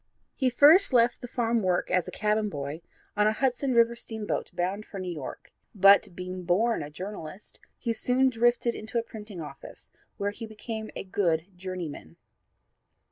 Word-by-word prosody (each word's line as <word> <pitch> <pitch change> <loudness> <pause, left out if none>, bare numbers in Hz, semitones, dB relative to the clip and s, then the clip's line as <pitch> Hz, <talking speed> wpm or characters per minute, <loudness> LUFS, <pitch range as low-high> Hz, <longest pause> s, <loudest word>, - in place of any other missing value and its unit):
He 260 -2 +1
first 295 +7 +7
left 240 0 +3
the 245 - -6
farm 235 -1 0
work 185 -2 0
as 180 -1 +2
a - - -6
cabin 210 0 0
boy 145 -1 -5 0.3
on 210 0 +3
a 215 - +3
Hudson 260 +2 0
river 235 0 +4
steamboat 220 -2 -4
bound 185 +4 -2
for 200 - -9
New 180 -1 -4
York, 150 -5 -8 0.2
but 195 -1 +6
being 180 0 -6
born 215 +7 +1
a 145 - -6
journalist 185 +2 -8 0.2
he 230 -2 -2
soon 255 +4 +2
drifted 240 0 +2
into 220 +3 -5
a 230 - +1
printing 210 -5 -9
office 145 -3 -11 0.3
where 200 0 -1
he 225 +2 -8
became 220 0 -6
a - - -4
good 175 -4 0
journeyman. 175 - -7
210 Hz, 170 wpm, -27 LUFS, 180-235 Hz, 0.3 s, first